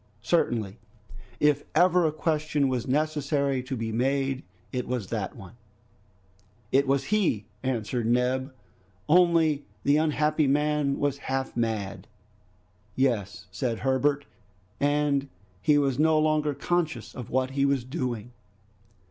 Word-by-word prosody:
Certainly, 115 Hz, -, 0 dB, 0.6 s
if 150 Hz, -1 st, +3 dB
ever 180 Hz, 0 st, +4 dB
a -, -, 0 dB
question 155 Hz, -2 st, 0 dB
was 125 Hz, -3 st, -2 dB
necessary 140 Hz, -1 st, 0 dB
to 130 Hz, +1 st, -5 dB
be 115 Hz, 0 st, -3 dB
made, 135 Hz, +3 st, 0 dB, 0.3 s
it 125 Hz, -1 st, -2 dB
was 120 Hz, -6 st, -3 dB
that 105 Hz, -5 st, -3 dB
one! 95 Hz, -3 st, -11 dB, 1.2 s
"It 140 Hz, +1 st, +3 dB
was 135 Hz, 0 st, +2 dB
he," 180 Hz, -, +1 dB, 0.2 s
answered 120 Hz, -2 st, -2 dB
Neb, 125 Hz, +3 st, +1 dB, 0.6 s
"only 165 Hz, -3 st, +4 dB, 0.2 s
the 145 Hz, +1 st, +4 dB
unhappy 155 Hz, -1 st, +2 dB
man 150 Hz, 0 st, +1 dB
was 140 Hz, -1 st, -1 dB
half 135 Hz, 0 st, -2 dB
mad." 110 Hz, -4 st, -2 dB, 0.9 s
"Yes!" 115 Hz, -10 st, 0 dB
said 115 Hz, +4 st, -2 dB
Herbert, 140 Hz, +2 st, +1 dB, 0.5 s
"and 145 Hz, -1 st, +1 dB, 0.3 s
he 145 Hz, +7 st, +4 dB
was 140 Hz, -2 st, +1 dB
no 160 Hz, 0 st, +4 dB
longer 155 Hz, -1 st, +1 dB
conscious 160 Hz, -4 st, -2 dB
of 125 Hz, -4 st, -8 dB
what 130 Hz, +1 st, 0 dB
he 135 Hz, 0 st, 0 dB
was 140 Hz, -2 st, +2 dB
doing." 125 Hz, -3 st, -4 dB
140 Hz, 125 wpm, -27 LUFS, 125-150 Hz, 1.2 s, ever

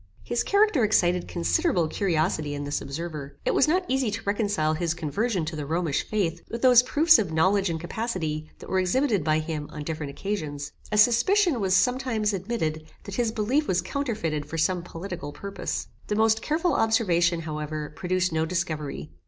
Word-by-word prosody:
His 240 Hz, -, -1 dB
character 400 Hz, -, +3 dB
excited 180 Hz, -4 st, +2 dB
considerable 90 Hz, -, +1 dB
curiosity 155 Hz, -4 st, 0 dB
in 145 Hz, -, -4 dB
this 145 Hz, 0 st, -2 dB
observer. 150 Hz, -1 st, -6 dB
It -, -, +2 dB
was 275 Hz, -, +4 dB
not 360 Hz, +4 st, +2 dB
easy 260 Hz, -3 st, +1 dB
to 225 Hz, +2 st, -4 dB
reconcile 200 Hz, -7 st, 0 dB
his 165 Hz, +1 st, -1 dB
conversion 180 Hz, -, -1 dB
to 160 Hz, +1 st, -4 dB
the 150 Hz, -2 st, -5 dB
Romish 165 Hz, -2 st, 0 dB
faith, 170 Hz, -6 st, -1 dB
with 230 Hz, +2 st, -5 dB
those 250 Hz, -2 st, +8 dB
proofs 310 Hz, +5 st, +5 dB
of 195 Hz, -7 st, -1 dB
knowledge 190 Hz, +4 st, +2 dB
and 165 Hz, -1 st, -2 dB
capacity 165 Hz, -5 st, -3 dB
that -, -, -12 dB
were 190 Hz, -, +1 dB
exhibited 205 Hz, -, +1 dB
by 155 Hz, 0 st, +2 dB
him 155 Hz, -2 st, -4 dB
on 150 Hz, -, -6 dB
different 155 Hz, -1 st, -4 dB
occasions. 145 Hz, -4 st, -4 dB, 0.2 s
A 210 Hz, -, +1 dB
suspicion 250 Hz, -, +4 dB
was, 190 Hz, -1 st, +2 dB
sometimes, 230 Hz, -1 st, +1 dB
admitted, 180 Hz, -6 st, -2 dB, 0.2 s
that 200 Hz, -, -8 dB
his 230 Hz, +1 st, 0 dB
belief 245 Hz, +8 st, 0 dB
was 180 Hz, -, +1 dB
counterfeited 210 Hz, -, -2 dB
for 165 Hz, -, -5 dB
some 180 Hz, +2 st, +1 dB
political 175 Hz, -2 st, -7 dB
purpose. 200 Hz, +4 st, -4 dB, 0.2 s
The 210 Hz, -, -1 dB
most 220 Hz, +1 st, +3 dB
careful 325 Hz, +2 st, 0 dB
observation, 180 Hz, -8 st, +2 dB
however, 150 Hz, -1 st, -5 dB
produced 185 Hz, -1 st, 0 dB
no 160 Hz, 0 st, +1 dB
discovery. 160 Hz, -3 st, -3 dB
185 Hz, 175 wpm, -26 LUFS, 155-225 Hz, 0.2 s, those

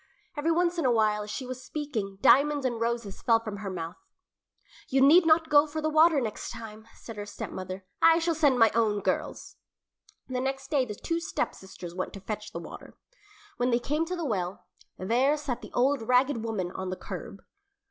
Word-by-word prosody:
Every 295 Hz, +2 st, -1 dB
once 345 Hz, +1 st, +1 dB
in 330 Hz, -, 0 dB
a 250 Hz, -, +4 dB
while 215 Hz, -2 st, +2 dB
as 210 Hz, -, -7 dB
she 255 Hz, +5 st, -4 dB
was 255 Hz, 0 st, -7 dB
speaking 245 Hz, -10 st, -4 dB
diamonds 290 Hz, 0 st, +5 dB
and 240 Hz, -3 st, -1 dB
roses 230 Hz, -4 st, -2 dB
fell 230 Hz, -1 st, +4 dB
from 215 Hz, -3 st, -6 dB
her 200 Hz, -1 st, -5 dB
mouth. 170 Hz, -2 st, -5 dB, 0.9 s
"You 270 Hz, -, +2 dB
need 320 Hz, +6 st, +6 dB
not 320 Hz, 0 st, +4 dB
go 290 Hz, +1 st, +6 dB
for 310 Hz, +1 st, -4 dB
the 310 Hz, 0 st, -1 dB
water 315 Hz, +1 st, +5 dB
the 275 Hz, -, +2 dB
next 215 Hz, -2 st, -4 dB
time," 220 Hz, -1 st, -9 dB
said 225 Hz, -2 st, -10 dB
her 205 Hz, -, -5 dB
stepmother. 185 Hz, -2 st, -6 dB, 0.2 s
"I 330 Hz, 0 st, +7 dB
shall 335 Hz, 0 st, +1 dB
send 290 Hz, -5 st, +3 dB
my 225 Hz, -2 st, +5 dB
own 215 Hz, -2 st, +1 dB
girls." -, -, -3 dB, 0.7 s
The 255 Hz, -1 st, -2 dB
next 270 Hz, +2 st, -3 dB
day 275 Hz, -4 st, +2 dB
the 210 Hz, -3 st, -6 dB
two 330 Hz, +10 st, -2 dB
stepsisters 190 Hz, -, -5 dB
went 185 Hz, +1 st, -4 dB
to 195 Hz, -, -8 dB
fetch 210 Hz, +2 st, -6 dB
the -, -, -6 dB
water. 170 Hz, -, -10 dB, 0.6 s
When 245 Hz, +1 st, +1 dB
they 235 Hz, -, +3 dB
came 295 Hz, +6 st, -1 dB
to 365 Hz, -, -3 dB
the 340 Hz, -2 st, -4 dB
well, 190 Hz, -7 st, -3 dB, 0.3 s
there 250 Hz, +10 st, +2 dB
sat 265 Hz, -5 st, -4 dB
the -, -, -10 dB
old 270 Hz, +2 st, +2 dB
ragged 250 Hz, +1 st, +2 dB
woman 205 Hz, -6 st, -3 dB
on 185 Hz, 0 st, -5 dB
the 185 Hz, -, -4 dB
curb. -, -, -8 dB
245 Hz, 205 wpm, -28 LUFS, 210-295 Hz, 0.9 s, I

